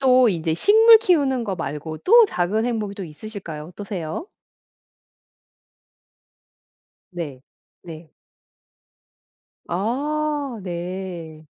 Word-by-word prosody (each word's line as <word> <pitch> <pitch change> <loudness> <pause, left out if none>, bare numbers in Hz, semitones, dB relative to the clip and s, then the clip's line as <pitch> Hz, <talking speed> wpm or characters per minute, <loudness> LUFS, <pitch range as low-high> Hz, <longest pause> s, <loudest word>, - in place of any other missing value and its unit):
또 255 -2 +5
인제 165 -4 -1
식물 445 - +7
키우는 285 - +1
거 200 -3 -2
말고 155 0 -5
또 460 - +6
작은 210 - -1
행복이 215 -4 -2
또 200 -2 -6
있으실까요? 165 -2 -8
어떠세요? 180 - -6 2.8
네. 155 -8 -7 0.4
네. 160 -2 -11 1.6
아. 285 - -2
네. 175 -3 -6
195 Hz, 160 characters per minute, -22 LUFS, 165-265 Hz, 2.8 s, 식물